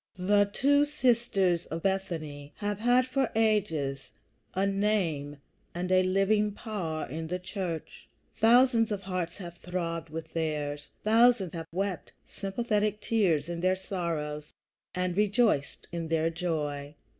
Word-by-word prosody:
The 205 +2 +3
two 285 +5 +4
sisters 235 - +1
of 165 +1 -5
Bethany 160 -7 -3
have 205 -1 -3
had 245 +3 +4
for 265 -1 0
ages 185 -12 +1 0.5
a 190 +1 +2
name 195 -8 0 0.4
and 180 +1 -2
a 185 0 +6
living 195 +3 +2
power 180 -8 -4
in 160 +5 -5
the 180 +2 -2
church. 180 -3 -5 0.3
Thousands 235 -1 +5
of 205 -2 -2
hearts 180 -2 -3
have 175 -3 -8
throbbed 170 -2 -3
with 160 +1 -7
theirs; 150 -3 -2
thousands 225 -4 +4
have 165 -1 -5
wept 190 0 -3
sympathetic 210 +1 -1
tears 185 -10 +1
in 170 -1 -4
their 185 +1 +3
sorrows 160 -6 -4 0.4
and 180 -1 -1
rejoiced 210 - +1
in 170 -1 -3
their 165 0 +1
joy. 150 -4 -3
185 Hz, 135 wpm, -29 LUFS, 165-210 Hz, 0.5 s, a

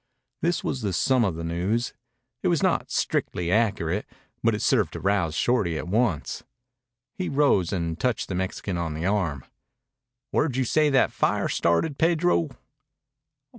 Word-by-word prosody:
This 175 +2 0
was 130 - -2
the 100 -3 -1
sum 130 +7 +3
of 95 -6 0
the 85 - -5
news. 90 +8 -1 0.5
It - - 0
was - - +2
not - - +1
strictly 85 -1 -1
accurate, 105 -4 +1 0.3
but 115 -1 +2
it 105 - -3
served 105 - +2
to - - -5
rouse 95 -5 +1
Shorty 100 -7 +1
at - - -5
once. 105 -5 0 0.8
He 185 - -1
rose 135 - +2
and 85 -3 -2
touched 125 -3 0
the - - -4
Mexican 95 0 -3
on 80 -2 -3
the 80 +2 -3
arm. 90 -10 0 0.9
"Where 150 - +2
you 130 +1 0
say 150 +5 +3
that 135 -2 +3
fire - - +1
started, 135 - +1
Pedro?" 165 -1 +2
105 Hz, 160 wpm, -25 LUFS, 85-130 Hz, 0.9 s, sum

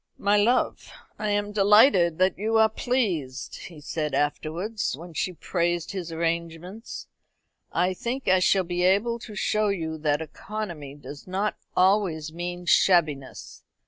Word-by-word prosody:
"My 205 +1 +2
love, 230 +5 +1 0.3
I 215 -1 -1
am 205 0 0
delighted 205 - +5
that 185 +1 +2
you 220 +3 0
are 220 0 +5
pleased," 185 - -2
he 165 -3 -12
said 150 +1 -3
afterwards, 165 +6 -2
when 170 +2 -10
she 180 +4 -2
praised 175 0 -1
his 180 -4 -5
arrangements. 170 +5 -4 0.7
"I 180 +2 +1
think 245 +7 -4
I 185 0 +5
shall 185 +1 +3
be 175 0 -3
able 205 +6 +2
to 220 -2 -10
show 215 0 +1
you 160 -5 -2
that 150 -1 +1
economy 170 -5 -7
does 145 +1 -11
not 195 +3 -1 0.2
always 180 -5 +2
mean 175 +1 -5
shabbiness. 155 -7 +1
180 Hz, 145 wpm, -26 LUFS, 160-210 Hz, 0.7 s, delighted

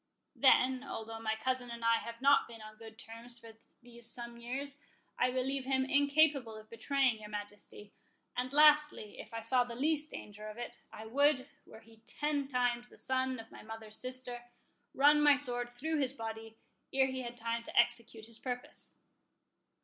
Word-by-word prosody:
Then, 260 -1 +5
although 225 -4 -6
my 220 -1 -1
cousin 255 +2 -2
and 235 -1 -5
I 230 0 +5
have 230 +1 -8
not 280 +1 +6
been 230 -1 -11
on 215 0 -11
good 225 0 -12
terms 235 +1 -8
for 230 -1 -11 0.3
these 235 -1 -5
some 235 0 -4
years, 275 +4 -5 0.4
I 250 - +4
believe 260 +1 -1
him 265 0 +2
incapable 280 -3 +3
of 215 0 -13
betraying 255 0 +1
your 210 -1 -9
Majesty; 205 0 -7 0.4
and 250 +1 -2
lastly, 300 -6 +5
if - - -9
I 230 0 -4
saw 245 +3 +3
the 240 -1 -7
least 300 +3 +1
danger 210 -4 -8
of 215 +1 -8
it, 240 - -6
I 220 - -9
would, 275 +3 +3 0.2
were 220 - -13
he 225 0 -19
ten 290 -2 -1
times 245 -2 0
the - - -17
son 260 0 -1
of 225 0 -11
my - - -11
mother's 220 -1 -8
sister, 255 -1 -6 0.5
run 295 +2 +6
my 295 -1 +7
sword 245 -4 -2
through 300 +6 -2
his 265 -2 +1
body, 225 -2 -7 0.3
ere 265 0 +4
he 260 0 -3
had 240 -1 -6
time 230 0 -1
to - - +1
execute 230 -2 0
his 230 0 -6
purpose." 250 -1 -2
245 Hz, 180 wpm, -34 LUFS, 225-270 Hz, 0.5 s, my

